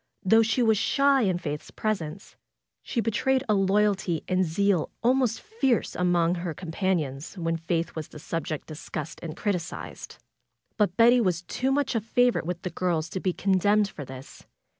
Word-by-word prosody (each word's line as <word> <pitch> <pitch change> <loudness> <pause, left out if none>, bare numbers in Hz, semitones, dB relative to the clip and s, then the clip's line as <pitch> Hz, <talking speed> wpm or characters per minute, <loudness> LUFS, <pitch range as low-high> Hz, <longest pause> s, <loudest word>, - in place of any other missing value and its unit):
Though 220 +4 +5
she 225 +3 +2
was 220 -3 +3
shy 275 -1 +3
in 190 -5 +1
Faith's 150 -3 -5
presence, 200 -5 -4 0.5
she 235 - -2
betrayed 255 +4 +1
a 215 - +3
loyalty 195 -3 +1
and 185 0 +2
zeal 185 +1 +1
almost 250 -2 +2
fierce 425 - 0
among 175 -1 +2
her 170 -2 -4
companions 165 -4 -2
when 165 -1 -1
Faith 165 0 -2
was 160 -2 -5
the - - -12
subject 155 0 -4
discussed 155 0 -6
and 165 -1 -6
criticized. 180 -6 -4 0.6
But 205 -4 +1
Betty 240 +2 +6
was 180 -4 0
too 260 +8 -1
much 285 -1 +1
a 225 - 0
favorite 245 -3 +2
with 180 -1 -4
the 180 - -3
girls 170 -3 -1
to 190 - -4
be 185 - 0
condemned 200 +3 +2
for 150 - -8
this. 130 0 -11
185 Hz, 165 wpm, -26 LUFS, 165-225 Hz, 0.6 s, Betty